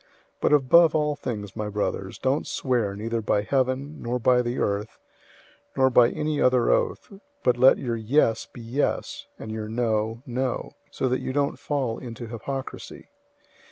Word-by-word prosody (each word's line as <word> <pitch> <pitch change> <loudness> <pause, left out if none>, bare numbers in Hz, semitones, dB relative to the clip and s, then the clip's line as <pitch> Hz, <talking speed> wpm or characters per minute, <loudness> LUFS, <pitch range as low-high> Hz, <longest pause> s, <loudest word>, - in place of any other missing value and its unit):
005:012 - - -33 0.3
But - - +3
above 150 +4 +5
all 150 -1 +1
things, 105 -8 -5
my 105 -1 -3
brothers, 100 -2 -3
don't 135 +3 0
swear, 120 -7 -1
neither 115 +2 -2
by 105 -1 +1
heaven, 135 +4 -1
nor 120 +1 -1
by 125 +1 +3
the 120 +1 -3
earth, 100 +2 -2 0.8
nor 130 0 +4
by 120 -1 +6
any 150 +1 -2
other 125 -2 +4
oath; - - 0 0.3
but 125 - +3
let 130 +2 +6
your 120 -3 -2
"yes" 115 0 +1
be 120 - -10
"yes," 120 +6 -2
and 110 - -7
your 110 -1 -5
"no," 115 0 -1
"no;" 125 -1 -2 0.2
so 130 - -2
that 130 +1 0
you 130 - -3
don't 140 0 0
fall 135 -6 -2
into 120 -2 -7
hypocrisy. 130 +4 -7
125 Hz, 165 wpm, -25 LUFS, 110-135 Hz, 0.8 s, by